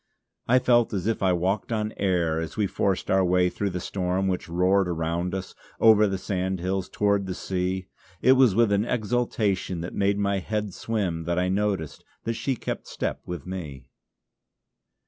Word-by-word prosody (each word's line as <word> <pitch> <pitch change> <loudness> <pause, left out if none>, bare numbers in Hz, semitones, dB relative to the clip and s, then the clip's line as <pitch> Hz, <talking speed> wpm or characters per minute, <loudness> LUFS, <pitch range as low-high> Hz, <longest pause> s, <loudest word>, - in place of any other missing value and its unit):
I 125 - +5
felt 120 -2 +3
as 95 -2 -2
if 115 0 0
I 95 -1 +3
walked 95 +5 0
on 110 -1 -1
air 85 -5 +1
as 80 +4 -6
we 105 - +2
forced 95 -1 -1
our 95 0 +4
way 90 0 +3
through 100 - -2
the 90 -1 -4
storm 95 +1 -1
which 90 -2 -2
roared 90 +3 +2
around 85 +2 -2
us, 95 -1 -5 0.3
over 110 -2 +6
the 95 -1 -1
sandhills 95 0 -2
towards 100 -1 +1
the 90 - -3
sea. 95 0 -2 0.3
It 130 - +5
was 130 -6 +5
with 115 -2 +4
an 100 +1 +3
exultation 110 -6 -1
that 85 - -6
made 100 0 +1
my 100 -1 +1
head 105 0 -3
swim 95 -8 -2
that 85 +1 -1
I 90 0 +1
noticed 95 -5 -1 0.2
that 115 - -1
she 135 +3 -1
kept - - -5
step - - -3
with 90 -4 -5
me. 85 -8 -7
95 Hz, 180 wpm, -26 LUFS, 90-105 Hz, 0.3 s, over